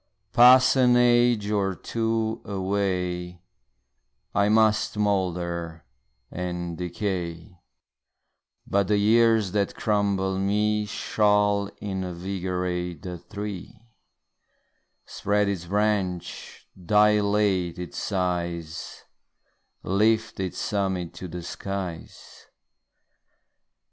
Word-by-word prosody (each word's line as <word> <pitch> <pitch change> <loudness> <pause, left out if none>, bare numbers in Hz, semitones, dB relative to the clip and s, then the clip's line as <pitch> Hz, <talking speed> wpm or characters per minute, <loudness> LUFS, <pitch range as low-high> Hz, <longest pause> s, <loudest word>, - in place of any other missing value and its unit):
Pass 125 +2 +7
an 125 -2 +5
age 120 -3 +3
or 100 -2 0
two 115 0 -2
away, 90 -3 -2 0.9
I 100 +1 +2
must 110 -1 +2
moulder 85 -5 -1 0.5
and 90 -1 -4
decay, 90 -2 -4 1.1
But 100 -1 +1
the 105 0 +2
years 110 -1 +3
that 100 -1 -1
crumble 100 -3 0
me 105 +2 +1
Shall 105 0 +1
invigorate 90 -2 -3
the 90 -2 -6
tree, 100 +1 -7 1.3
Spread 105 0 0
its 95 -4 -3
branch, 100 -2 -2 0.2
dilate 105 -2 +2
its 90 -3 -6
size, 85 -4 -3 0.8
Lift 110 +4 +1
its 95 -2 -3
summit 95 -4 -2
to 95 - -7
the 85 0 -7
skies. 95 -2 -7
100 Hz, 85 wpm, -25 LUFS, 90-105 Hz, 1.3 s, Pass